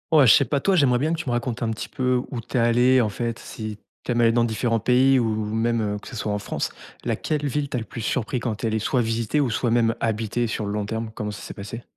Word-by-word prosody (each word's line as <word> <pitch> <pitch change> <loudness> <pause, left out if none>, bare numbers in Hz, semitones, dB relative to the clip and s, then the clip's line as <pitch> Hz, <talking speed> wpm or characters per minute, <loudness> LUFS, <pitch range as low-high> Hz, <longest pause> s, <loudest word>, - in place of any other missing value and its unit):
Ouais, 145 -5 +7
je - - +9
sais - - +6
pas 140 +3 0
toi, 195 +7 +2
j'aimerais 130 -7 +4
bien 155 +5 +1
que 165 - -2
tu 170 - -4
me - - 0
racontes 120 0 -2
un 115 - 0
petit 110 - -5
peu 125 -2 0
où 125 -4 -3
tu 120 - -4
es - - +4
allé, 120 +2 +4
en 115 - +3
fait, 115 +2 -3
si 110 -2 -7 0.3
tu - - -3
aimes 120 - +1
aller 115 -1 +4
dans 120 0 +3
différents 115 0 0
pays 130 +3 +4
ou 110 -2 0
même, 115 +1 +1
heu, 105 -1 -2
que - - -13
ce 125 - -7
soit 105 -1 -2
en - - 0
France? 100 - -3 0.3
Laquelle 150 -2 -1
ville 145 +1 -1
t'a - - -2
le 115 - -4
plus 115 - -7
surpris 120 +2 -1
quand 115 -3 -2
tu 115 - -5
es - - +2
allé 110 0 0
soit 125 +4 0
visiter 115 +4 0
ou 140 -4 +2
soit 120 +1 0
même 115 -1 +3
habiter 115 +1 0
sur 110 -1 -3
le 100 - -3
long 105 -1 -1
terme? 110 +1 -4
Comment 105 0 -3
ça 105 - -8
s'est - - -7
passé? 105 +4 -7
115 Hz, 295 wpm, -24 LUFS, 110-125 Hz, 0.3 s, je